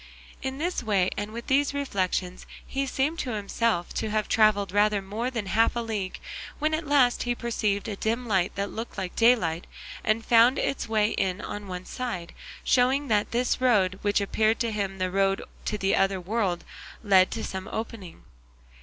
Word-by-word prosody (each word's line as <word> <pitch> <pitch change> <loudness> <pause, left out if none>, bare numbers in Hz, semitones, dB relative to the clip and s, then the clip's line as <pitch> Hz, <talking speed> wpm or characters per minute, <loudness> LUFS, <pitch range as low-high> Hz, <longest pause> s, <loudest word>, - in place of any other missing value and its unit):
'" - - -21
In 265 0 -3
this 345 +2 -1
way 200 -5 +1
and 205 +1 -3
with 235 +2 -7
these 285 +1 +2
reflections 185 -8 -2 0.2
he 275 0 -2
seemed 290 +6 -1
to 250 - -2
himself 210 -2 -1
to 220 - -2
have 215 0 0
travelled 210 -3 +3
rather 205 +1 +3
more 210 +6 -3
than 230 -5 -3
half 225 +5 +2
a - - 0
league, 215 -5 -3 0.4
when 310 +1 0
at 310 -1 -2
last 270 -4 +4
he 245 0 0
perceived 215 -4 -1
a 210 - -3
dim 230 +4 -2
light 190 -4 +1
that 200 0 -2
looked 225 0 -6
like 185 -2 -4
daylight 215 -9 +3 0.4
and 215 +1 +1
found 235 +2 +5
its 275 - -2
way 215 -1 +2
in 185 0 -1
on 205 0 -6
one 180 0 -6
side, 190 -10 -5 0.3
showing 265 +3 +2
that 210 -2 +2
this 245 +2 0
road, 195 -7 +3
which 205 0 +2
appeared 215 +2 +1
to 230 -1 0
him 200 -2 -2
the 185 -1 -1
road 195 0 +1 0.2
to 210 - -1
the 195 -1 +1
other 195 0 +2
world, 190 -1 -1 0.4
led 190 -3 +5
to 225 - -4
some 190 -1 -5
opening. 220 -6 -6
215 Hz, 190 wpm, -26 LUFS, 195-240 Hz, 0.4 s, found